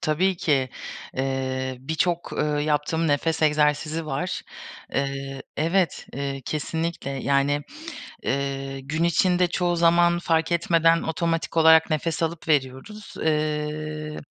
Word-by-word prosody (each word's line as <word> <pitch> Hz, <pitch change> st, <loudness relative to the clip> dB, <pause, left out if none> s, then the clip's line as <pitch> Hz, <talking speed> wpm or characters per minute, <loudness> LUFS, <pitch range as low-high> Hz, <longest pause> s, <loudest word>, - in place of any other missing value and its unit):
Tabii 180 Hz, +5 st, +1 dB
ki, 135 Hz, -6 st, +1 dB, 0.5 s
eee, 130 Hz, -1 st, -2 dB
birçok, 165 Hz, +4 st, -1 dB
ııı, 150 Hz, -1 st, 0 dB
yaptığım 155 Hz, +2 st, 0 dB
nefes 160 Hz, +3 st, +1 dB
egzersizi 150 Hz, +1 st, +2 dB
var. 150 Hz, +6 st, -3 dB, 0.5 s
Eee, 135 Hz, 0 st, -2 dB
evet, 170 Hz, +3 st, +1 dB
eee, 135 Hz, 0 st, -4 dB
kesinlikle. 160 Hz, 0 st, -3 dB
Yani, 140 Hz, +1 st, +1 dB, 0.6 s
eee, 135 Hz, 0 st, -2 dB
gün 155 Hz, +5 st, -1 dB
içinde 180 Hz, +1 st, +3 dB
çoğu 175 Hz, 0 st, 0 dB
zaman 170 Hz, +1 st, +4 dB
fark 165 Hz, 0 st, +1 dB
etmeden 165 Hz, -1 st, +3 dB
otomatik 165 Hz, 0 st, -2 dB
olarak 160 Hz, 0 st, +6 dB
nefes 160 Hz, +1 st, -1 dB
alıp 165 Hz, +1 st, -3 dB
veriyoruz. 150 Hz, +9 st, -1 dB
Eee, 155 Hz, 0 st, -2 dB
155 Hz, 115 wpm, -24 LUFS, 140-165 Hz, 0.6 s, olarak